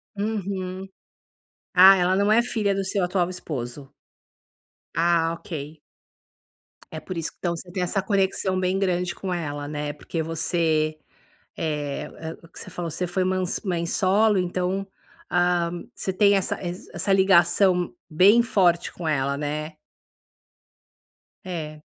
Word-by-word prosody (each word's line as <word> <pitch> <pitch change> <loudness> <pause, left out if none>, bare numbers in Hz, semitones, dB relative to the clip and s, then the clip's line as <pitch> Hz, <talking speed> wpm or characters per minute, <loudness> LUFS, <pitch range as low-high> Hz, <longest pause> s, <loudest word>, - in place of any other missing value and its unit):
Uhum. 195 -3 -3 0.9
Ah, 190 +1 +9
ela 180 +1 +2
não 200 +2 +2
é 225 +2 +6
filha 215 -5 0
do 195 - -1
seu 195 -1 0
atual 180 0 +1
esposo? 140 -6 -6 1.0
Ah, 165 -1 +2
ok. 155 -2 -7 1.2
É 155 - -4
por 185 +1 -7
isso 165 -1 -3
que - - -35
então 170 -1 -1
você 175 +2 -9
tem 185 - -3
essa 180 +2 0
conexão 190 -1 0
bem 185 +1 0
grande 180 -2 0
com 185 -2 -4
ela, 145 -4 -4
né. 145 0 -4
Porque 160 +2 -4
você, 160 -1 0 0.6
eh, 150 -3 -3
é 160 0 -5
o 165 - -15
que - - -15
você - - -9
falou, 170 -2 -4
você 180 +4 -2
foi 180 +2 -1
ma 185 0 0 0.2
mãe 175 -4 -1
solo 200 +4 +3
então, 185 +2 -1 0.4
ah, 175 -1 +2 0.2
você 190 - -3
tem 200 +1 +5
essa 195 -2 0
ess 175 +1 -6
essa 195 - 0
ligação 185 - +4
bem 195 +9 +6
forte 180 -7 +2
com 175 - -7
ela, 140 -2 0
né. 150 +2 -4 1.7
É. 155 -4 -6
180 Hz, 145 wpm, -24 LUFS, 160-190 Hz, 1.7 s, Ah